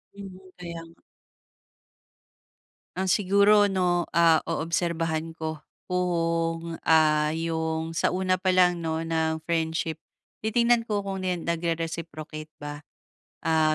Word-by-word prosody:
Mhm, 195 -2 -9 0.2
kaya 170 -2 -7
nga. 165 - -21 1.9
Ah 190 0 -1
siguro 205 +2 +5
',o, 180 -3 +1
ah, 165 -2 +6
oobserbahan 165 0 -1
ko 160 -1 -4 0.3
kung, 165 -2 -1
ah, 155 -1 +4
yung 160 0 -2
sa - - +2
una 185 0 +1
pa 185 0 +2
lang 180 -1 +4
'no 160 0 -1
ng 160 -1 -1
friendship, 160 -1 -1 0.5
titingnan 235 +1 +2
ko 205 -2 0
kung 195 -1 -4
nen 180 -2 -1
nagre-reciprocate 165 -2 -4
ba. 145 0 -6 0.6
Ah 155 -1 +3
165 Hz, 115 wpm, -26 LUFS, 160-185 Hz, 1.9 s, ah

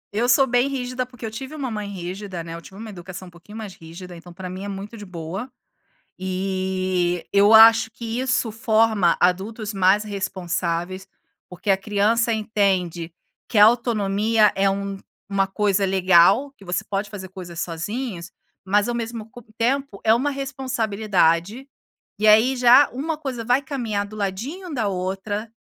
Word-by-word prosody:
Eu 240 +3 +1
sou 270 +1 +5
bem 245 +1 +2
rígida, 255 -2 -3
porque 245 -2 -10
eu 220 - -4
tive 265 +7 -7
uma 265 -5 -4
mãe 210 -1 -4
rígida, 185 -1 -6
né, 165 0 -8
eu 170 - -7
tive 190 - -14
uma 220 -1 -7
educação 185 0 -9
um - - -19
pouquinho 190 +6 -13
mais 210 -4 -7
rígida, 175 +2 -11
então 175 +1 -12
para 185 +1 -8
mim 185 +2 -7
é - - -5
muito 200 +3 -7
de 205 -2 -9
boa. 185 +8 -6 0.7
E, 185 -1 -1
eu 200 +2 +5
acho 225 0 +8
que 230 0 -5
isso 255 -3 0
forma 220 -4 +2
adultos 205 +4 0
mais 195 +2 +3
responsáveis, 185 -2 -3 0.4
porque 180 +3 -9
a 190 - +5
criança 215 +4 +1
entende 190 -6 0 0.3
que 220 - 0
a 210 - +9
autonomia 220 -2 +2
é 195 0 +2
um 195 0 -3 0.3
uma 195 -1 +1
coisa 200 0 +1
legal, 190 +7 +4
que 200 - -16
você 180 -1 -2
pode 200 0 -3
fazer 190 -3 -8
coisas 175 -3 -8
sozinhos, 185 +2 -5 0.3
mas 205 +4 +2
ao 240 - -1
mesmo 225 -1 -5
co 245 - -12 0.2
tempo, 265 -2 -1
é 220 - +4
uma 260 +5 +2
responsabilidade, 225 - 0 0.5
e 215 - +1
aí, 230 +5 +5
já 250 +3 +6
uma 300 +5 -3
coisa 255 -6 -5
vai 250 +3 +3
caminhar 230 -8 -3
do 215 +1 -11
ladinho 255 - -4
da 220 -5 0
outra, 195 +4 -3
205 Hz, 170 wpm, -22 LUFS, 185-230 Hz, 0.7 s, a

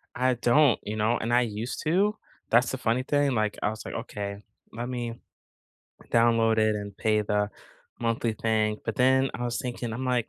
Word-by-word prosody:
I 130 0 +2
don't, 120 +3 +4
you 105 - -4
know, 110 +2 +1
and 115 +1 -2
I 120 - +5
used 115 +1 -3
to, 195 +7 +2 0.3
that's 120 +2 +4
the 130 - -3
funny 125 0 0
thing, 145 +1 +2
like, 110 -3 0
I - - +2
was 110 0 -6
like, - - -7
"Okay, 100 -4 -5 0.3
let 120 +2 -5
me 120 -2 -4 0.9
download 115 -1 +4
it 110 0 +3
and 100 -1 -6
pay 110 -1 +2
the 105 0 0 0.5
monthly 115 0 0
thing." 110 -1 0
But, 110 - -3
then 130 +1 +4
I 120 - -3
was 120 -1 -2
thinking 120 -2 -4
I'm 125 +4 -4
like, 125 -3 0
115 Hz, 195 wpm, -27 LUFS, 110-125 Hz, 0.9 s, I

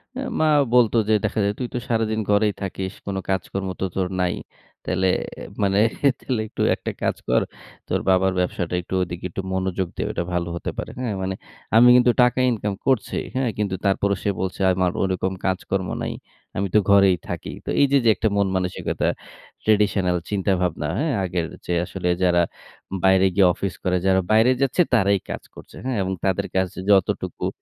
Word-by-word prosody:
অ্যা 270 - -3 0.2
মা 155 - +3 0.3
বলত, 120 -3 +5 0.2
যে, - - +4
"দেখা 105 +1 -1
যায় 100 - +1
তুই 125 - -2
তো - - -1
সারাদিন 110 -1 0
ঘরেই 105 0 +3
থাকিস। 95 0 -4
কোন 100 - -3
কাজকর্ম 95 0 -2
তো - - +1
তোর 95 -1 0
নাই। 90 -1 +1 0.5
তাইলে 95 +1 +1 0.5
মানে 100 0 +2 0.4
তাইলে 125 -4 -2
একটু - - -5
একটা - - -5
কাজ - - +1
কর। - - +3 0.5
তোর - - 0
বাবার 95 0 +3
ব্যবসাটা 90 -1 -2
একটু 85 - -9
ওদিকে 90 0 -6
একটু 95 - -4
মনোযোগ 95 0 -1
দে, - - -2
ওইটা - - -2
ভালো 85 -1 -1
হতে 85 - -4
পারে।" - - -4
হ্যাঁ, 120 -5 -2
মানে 95 0 -2 0.4
আমি 120 +2 +8
কিন্তু 125 0 +5
টাকা 125 +1 +2
ইনকাম 105 -3 -2
করছি। 130 -5 +1 0.2
হ্যাঁ, 130 -2 +1
কিন্তু 100 -3 -1
তারপরেও 100 0 +2
সে - - +1
বলছে 95 -1 -3
আমার 90 -1 +1
ওরকম 95 0 0
কাজকর্ম 95 0 -1
নাই। - - -2 0.4
আমি 100 +1 0
তো - - +8
ঘরেই 100 -2 +6
থাকি। - - -5
তো - - -5
এই - - +7
যে, 140 - +5 0.2
একটা 110 - 0
মন 100 -1 +3
মানসিকতা। 90 -1 -1 0.6
traditional 105 -4 +2
চিন্তাভাবনা 90 -6 0
হ্যাঁ, 155 -1 0
আগের 90 -2 -1 0.2
যে, 90 - -1
আসলে 90 -1 -3
যারা 85 -1 +4 0.6
বাইরে 95 0 +5
গিয়ে 95 -2 +6
অফিস 95 0 -3
করে, 90 0 +1
যারা 95 0 +4
বাইরে 110 +3 +5
যাচ্ছে 135 +6 +2
তারাই 100 -4 +4
কাজ - - -5
করছে, - - -13
হ্যাঁ, 130 -3 -1
এবং 95 0 -2
তাদের 95 -2 0
কাছে 95 -1 -1
যতটুকু 95 -3 +1
95 Hz, 180 wpm, -23 LUFS, 95-110 Hz, 0.6 s, আমি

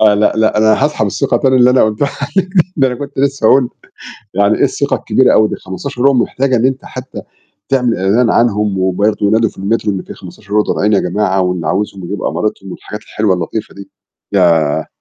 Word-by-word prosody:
آه 105 -1 +5
لأ، 105 +1 +2
لأ 110 -1 +2
أنا 110 +4 +3
هاسحب 150 -8 0
الثقة 100 - 0
تاني 130 -1 +2
اللي 125 0 +5
أنا 130 - +4
قُلتها 110 +6 -1
عليك، 185 +7 -1 0.3
ده 135 -3 +3
أنا 125 - -3
كنت 140 +3 -8
لسه 140 -4 +1
هاقول 130 -1 +4 0.6
يعني 100 +2 +2
إيه - - 0
الثقة - - -1
الكبيرة - - +2
أوي 110 0 +4
دي - - -4
ال15€ 135 +8 -1
محتاجة 130 +1 0
إن 120 +2 +2
أنت 130 0 -3
حتى 130 +1 -8 0.5
تعمل 125 -3 +1
إعلان 105 +6 +2
عنهم 105 -4 +1
وبرضه 100 +3 0
ينادوا 110 +1 +2
في - - -22
المترو 105 +2 -1
إن 95 - -4
في - - -10
15€ 105 +1 -3
ضايعين 105 0 0
يا 100 - +3
جماعة، 95 +1 0
واللي 90 -3 -2
عاوزهم 95 +1 -2
يجيب 100 +2 -5
أمارِتهُم 100 -2 -3
والحاجات 105 - -8
الحلوة 105 -3 -1
اللطيفة 90 +5 -5
دي، 100 0 -12 0.4
ياه! 85 -6 +2
110 Hz, 195 wpm, -14 LUFS, 100-125 Hz, 0.6 s, آه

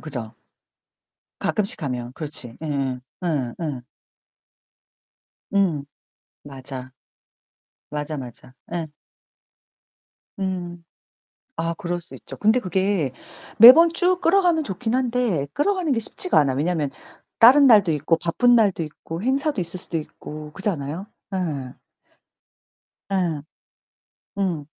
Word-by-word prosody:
그죠? 125 -8 -6 1.0
가끔씩 200 -4 -1
하면 125 -3 -4
그렇지. 145 -6 -5
예예. 135 -4 -2 0.2
예. 140 -8 -1
예. 145 -6 -3 1.7
음, 180 -8 +1 0.6
맞아. 130 -2 -8 1.0
맞아, 150 +1 -4
맞아. 125 -1 -10 0.2
예. 170 -2 -2 1.5
음. 175 -3 -4 0.7
아, 165 0 -1
그럴 175 +1 -4
수 175 - -15
있죠. - - -10
근데 220 +4 +3
그게 190 - 0 0.5
매번 300 +9 +10
쭉 360 +1 +2
끌어가면 345 -3 +3
좋긴 220 +2 -3
한데 245 - 0
끌어가는 360 -1 0
게 235 - +1
쉽지가 360 - +1
않아. 140 -3 +2
왜냐면 150 0 0 0.5
다른 270 +5 +8
날도 205 -8 +6
있고 155 +2 +1
바쁜 240 +10 +3
날도 205 -7 +3
있고 165 +2 -7
행사도 270 0 0
있을 175 +1 -5
수도 170 -2 -4
있고 150 0 -9
그렇지 195 +5 -3
않아요? 160 +4 -5 0.3
예. 145 -9 -3 1.4
예. 175 -6 0 1.0
음. 175 -7 -1
175 Hz, 210 characters per minute, -23 LUFS, 145-220 Hz, 1.7 s, 매번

